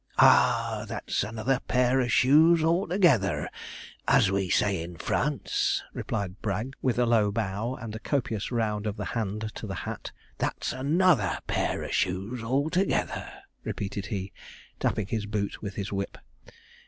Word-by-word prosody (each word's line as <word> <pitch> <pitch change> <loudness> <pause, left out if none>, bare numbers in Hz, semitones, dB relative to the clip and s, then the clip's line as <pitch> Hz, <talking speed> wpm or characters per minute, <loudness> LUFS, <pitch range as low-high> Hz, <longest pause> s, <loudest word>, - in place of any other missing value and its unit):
'Ah! 115 -3 +4
that's 110 -3 -2
another 115 +5 -1
pair 125 +1 +3
of 120 -2 +1
shoes 155 +7 +5
altogether, 170 - +2 0.6
as 95 - +5
we 95 -2 0
say 100 -3 +2
in 85 +1 -7
France,' - - 0
replied 100 -2 -4
Bragg, 110 +5 -2
with 130 -3 +1
a 125 - +3
low 110 -3 +3
bow 110 +3 -2
and 115 -3 -7
a - - -5
copious 115 -6 -2
round 110 -3 -1
of 105 +1 -3
the - - -3
hand 110 -1 -3
to 110 - -7
the 95 - -4
hat. - - -5 0.3
'That's - - -2
another 145 - +2
pair - - -1
of - - -5
shoes 95 +7 -1
altogether,' 150 +10 0 0.3
repeated 100 0 -4
he, 95 -2 -4 0.5
tapping 110 - 0
his 105 0 -3
boot 105 -1 -3
with 100 -1 -5
his 100 -1 -4
whip. 100 0 -3
110 Hz, 150 wpm, -27 LUFS, 100-130 Hz, 0.6 s, shoes